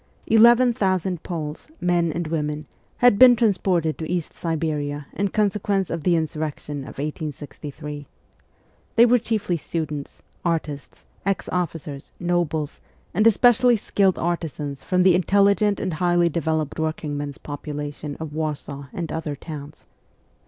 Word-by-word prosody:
Eleven 235 +2 +6
thousand 185 -5 0
Poles, 155 -4 -5
men 175 -2 +2
and 170 +2 -3
women, 150 -1 -2 0.3
had 245 -5 +5
been 250 -1 +9
transported 185 -7 +1
to 160 - -4
East 175 -3 -2
Siberia 150 -3 -2
in 200 - 0
consequence 200 -1 0
of 165 -2 -3
the 175 +1 +3
insurrection 155 -2 -3
of 135 - -9
1863. 150 0 -6 0.9
They 235 - +8
were 245 +1 +5
chiefly 215 -6 -1
students, 150 -2 -5 0.2
artists, 155 -4 -3 0.2
ex 195 0 -1
officers, 160 -5 -4
nobles, 170 -4 -1 0.3
and 215 +5 +4
especially 245 +2 +5
skilled 195 -3 +1
artisans 150 -5 -3
from 180 +6 +2
the 185 -1 +6
intelligent 200 +3 +3
and 185 -3 -2
highly 175 +1 +2
developed 160 -2 -1
working 155 -2 -2
men's 145 -1 -4
population 145 0 -6
of 160 -2 -6
Warsaw 150 -3 -4
and 170 -3 -4
other 160 -2 -3
towns. 145 0 -9
165 Hz, 130 wpm, -23 LUFS, 150-190 Hz, 0.9 s, been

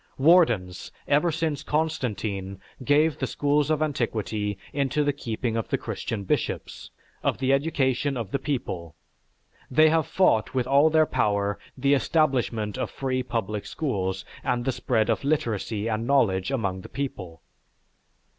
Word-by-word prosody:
Wardens, 120 - +3 0.2
ever 150 +4 +3
since 155 -2 -1
Constantine 110 - -2 0.2
gave 150 +3 +3
the 130 - -1
schools 145 +2 +1
of 155 0 +2
antiquity 110 -7 -2 0.2
into 140 +1 +1
the 145 0 +1
keeping 115 -3 -3
of 115 - -2
the - - 0
Christian 105 -3 -4
bishops, 95 - -2 0.3
of - - 0
the 135 +1 +2
education 135 -2 +1
of 115 -5 -5
the 140 - 0
people, 90 - -4 0.7
they 155 +4 +5
have 160 -1 +2
fought 120 - +2
with 125 -2 +1
all 140 +4 +5
their 155 0 +4
power 100 -7 0 0.2
the 140 +2 +3
establishment 130 -8 +1
of - - -2
free 130 -1 -2
public 110 -4 -3
schools 95 - -2 0.2
and 120 -1 -1
the 135 - +2
spread 115 -3 0
of - - 0
literacy 115 -7 -1
and 115 +1 -2
knowledge 110 -9 +2
among 100 -9 -2
the - - -11
people." 95 -12 -5
130 Hz, 145 wpm, -26 LUFS, 105-145 Hz, 0.7 s, they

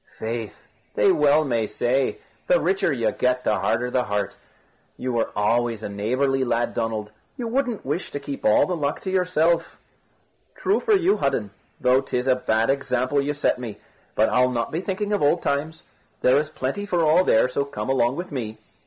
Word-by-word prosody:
"Faith, 115 -1 -5 0.3
they - - +4
may - - +7
well 145 -8 +2
say, 130 - 0 0.3
the - - +4
richer 390 - +1
you 115 -5 0
get, 125 +2 0
the - - +1
harder 125 +2 0
the 125 -1 +1
heart. 100 0 -2 0.6
You 120 -3 -1
always 115 +1 +1
were - - -2
a - - -8
neighbourly 130 +6 0
lad, 120 -1 0
Donald. 110 -2 -3 0.3
You 240 -3 -3
wouldn't 245 -2 -1
wish 150 +7 -2
to 145 - -5
keep 140 0 -6
the - - +3
luck 145 +5 +2
all - - -15
to 190 - -3
yourself?" 170 -3 +1 0.8
"True 395 - +1
for 425 -2 +3
you, 380 +2 +2
Hudden, 105 -3 -1 0.3
though 125 +1 +3
'tis 125 -2 -2
a 130 -1 +4
bad 115 -1 +1
example 135 0 0
you 145 +1 -2
set 145 - +1
me. 115 -4 -6 0.4
But 110 - +3
I'll 125 0 +3
not 115 -2 -2
be 165 - -2
thinking 205 +2 -2
of 205 - 0
old 150 +4 +2
times. 155 +3 -2 0.4
There 130 +2 +4
is 150 +1 -3
plenty 155 +8 -4
for 175 -4 +1
all 160 +4 +5
there, 110 -7 +4
so 135 +2 -1
come 115 -6 -6
along 130 -1 +2
with 175 +2 -6
me." 110 -6 -4
135 Hz, 195 wpm, -23 LUFS, 120-160 Hz, 0.8 s, may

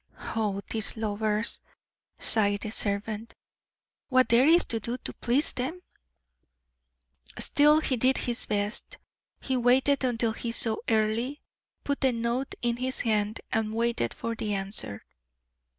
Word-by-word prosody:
"Oh, 205 -3 -1
these 220 0 -1
lovers," 215 0 -1 0.6
sighed 205 -2 +3
the 215 - -3
servant. 210 +2 -2 0.7
"What 255 -1 +4
there 240 +4 +5
is 340 +2 +5
to 225 - -2
do 235 +3 -4
to - - -7
please 260 +6 0
them!" 270 +8 -3 1.6
Still, 300 +1 +4
he 260 -4 0
did 260 +3 +3
his 240 -1 -2
best. 205 +1 -2 0.4
He 265 - -1
waited 260 +3 +3
until 235 -2 +1
he 230 0 -4
saw 225 -1 +1
Earle, 225 +4 +1 0.5
put 285 0 -2
the 265 -2 +3
note 235 +3 -2
in 240 0 +1
his 260 +1 -2
hand, 215 -1 0
and 220 0 -1
waited 230 - 0
for 230 - -3
the 215 -2 -2
answer. 195 - -1
230 Hz, 135 wpm, -27 LUFS, 215-255 Hz, 1.6 s, there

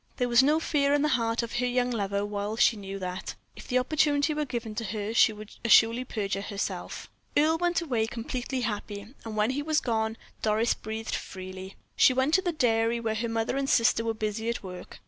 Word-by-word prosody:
There 250 - +1
was 240 +1 +6
no 300 +4 +3
fear 285 -3 +2
in 290 - +1
the 300 - +2
heart 230 -2 +1
of 235 +1 -4
her 250 - +1
young 250 0 +1
lover, 200 -3 -1
while 205 +1 -3
she 235 0 +4
knew 195 -1 -6
that, 185 -1 -5 0.2
if - - -11
the 255 - +1
opportunity 290 +2 +2
were 300 0 -1
given 235 -4 -4
to 230 - -3
her, 210 +1 -3
she 230 - +5
would 215 0 -10
assuredly 235 +2 +5
perjure 200 -4 -2
herself. 200 0 -4 0.3
Earle 315 +2 +3
went 350 -1 +1
away 235 -8 0
completely 245 +3 -4
happy, 210 0 -4
and 220 -1 -6
when 210 +3 +2
he 280 +2 -2
was 310 +1 +1
gone 220 -2 -1 0.2
Doris 220 +2 +2
breathed 220 +1 -5
freely. 185 0 -6 0.2
She 255 - +5
went 265 +4 +1
to 380 - +5
the 355 - -1
dairy 235 -5 +1
where 225 -1 -1
her 230 +2 -2
mother 225 +3 -1
and 275 0 -1
sister 230 -1 +3
were 225 0 -1
busy 220 +1 -2
at 235 - -3
work. 180 -1 -9
230 Hz, 215 wpm, -28 LUFS, 215-260 Hz, 0.3 s, was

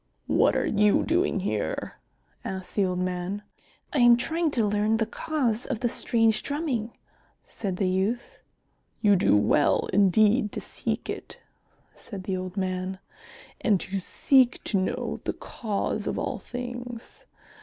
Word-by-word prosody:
"What - - +3
are - - +1
you 210 -1 +3
doing 335 - +1
here?" 105 - -3 0.5
asked 190 -1 -5
the 200 - +2
old 180 -1 -1
man. 180 +2 -2 0.5
"I 290 - +1
am 240 -1 +7
trying 325 +6 0
to 225 - +3
learn 210 +2 +2
the 225 - +1
cause 245 -1 -1
of 265 -4 -3
the 240 - +1
strange 225 -3 +2
drumming," 275 -7 -3 0.5
said 195 -4 -4
the 190 - +1
youth. 195 +6 -1 0.6
"You 205 -2 +5
do 180 - +4
well 105 +8 +3
indeed 210 +3 +4
to - - -3
seek - - -4
it," - - -6 0.6
said 200 -4 -9
the 190 -1 -2
old 185 +1 -5
man, 185 0 -2 0.6
"and 205 -5 +3
to 195 +2 -3
seek 260 +5 +3
to 205 - 0
know 185 - -2
the - - -2
cause 210 -4 -3
of - - -2
all - - -2
things. 245 -1 -7
210 Hz, 150 wpm, -26 LUFS, 190-240 Hz, 0.6 s, am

